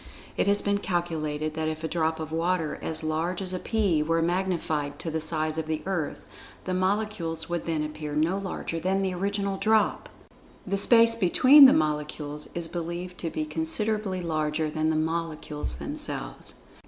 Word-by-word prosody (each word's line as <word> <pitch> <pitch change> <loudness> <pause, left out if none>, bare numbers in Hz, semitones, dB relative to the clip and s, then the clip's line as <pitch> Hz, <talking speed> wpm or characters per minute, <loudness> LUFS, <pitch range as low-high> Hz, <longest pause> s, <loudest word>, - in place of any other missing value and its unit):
It - - 0
has 200 0 +4
been 200 0 +1
calculated 155 -4 -2
that 160 0 -2
if 155 0 -4
a - - 0
drop 160 -1 -1
of 155 -1 -5
water 165 -1 -1
as 160 0 -2
large 160 +3 -1
as 185 -1 -4
a 185 - -2
pea 200 -9 +1
were 165 +2 +1
magnified 170 -5 -1
to 165 - -5
the 160 - -1
size 155 0 0
of 160 - -4
the 155 -1 -2
Earth, 180 -6 -2 0.4
the 185 - -2
molecules 185 -3 -1
would 175 -1 -3
then 160 -2 0
appear 150 -1 -5
no 165 +6 +1
larger 185 -3 -4
than 190 +3 0
the 190 -1 -1
original 200 +1 -1
drop. 215 +1 +1 0.6
The 195 - -1
space 230 +3 +6
between 255 +7 +7
the 260 - +6
molecules 150 -1 -2
is 170 -1 -1
believed 175 +2 -5
to 165 - -3
be 155 -1 -3
considerably 185 +5 -1
larger 155 -1 -1
than 155 0 0
the 160 - +1
molecules 155 - -2
themselves. - - -4
165 Hz, 175 wpm, -27 LUFS, 155-190 Hz, 0.6 s, between